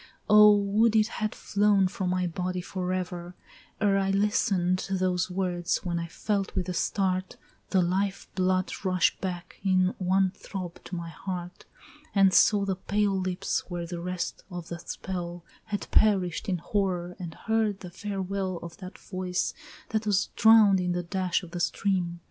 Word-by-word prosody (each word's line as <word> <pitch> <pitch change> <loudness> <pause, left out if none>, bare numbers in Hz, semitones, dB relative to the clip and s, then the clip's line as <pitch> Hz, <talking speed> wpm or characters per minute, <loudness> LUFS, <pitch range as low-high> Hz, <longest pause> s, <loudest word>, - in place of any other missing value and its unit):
Oh, 210 0 +8
would 210 +3 +2
it 215 -1 +5
had 215 -2 -3
flown 200 -2 +2
from 190 -2 -3
my 185 0 +1
body 180 +1 -2
forever, 180 -1 -4 0.4
Ere 200 -2 +3
I 195 0 0
listen'd 195 -2 +2
those 185 -1 0
words, 180 -1 -1
when 170 -1 -1
I 170 - -4
felt 195 +3 -2
with 185 -2 -1
a 180 - -2
start, 185 0 -1 0.3
The 185 -2 +3
life 195 +3 -1
blood 185 0 +1
rush 185 -2 +2
back 180 -2 -5
in 185 -1 +3
one 190 0 +2
throb 180 -3 -7
to 180 - -6
my 170 -1 -5
heart, 180 +1 -6 0.5
And 195 -1 +5
saw 205 -2 +5
the 190 -2 -1
pale 205 +1 0
lips 185 0 -2
where 175 -1 -3
the 175 0 -5
rest 180 0 -4
of 175 -3 -7
that 170 0 -8
spell 175 -2 -5 0.2
Had 205 -1 -4
perished 195 -3 +3
in 180 - +1
horror 180 -1 -1
and 170 -3 -6
heard 220 -3 0
the 180 -3 -8
farewell 195 -1 -3
Of 170 -1 -9
that 185 0 -9
voice 185 -1 -2 0.4
that 220 -1 -1
was 200 -1 +2
drown'd 220 -3 +6
in 180 -1 0
the 175 0 -2
dash 185 0 -1
of 170 - -10
the 175 - -4
stream! 175 -1 0
185 Hz, 165 wpm, -27 LUFS, 180-200 Hz, 0.5 s, Oh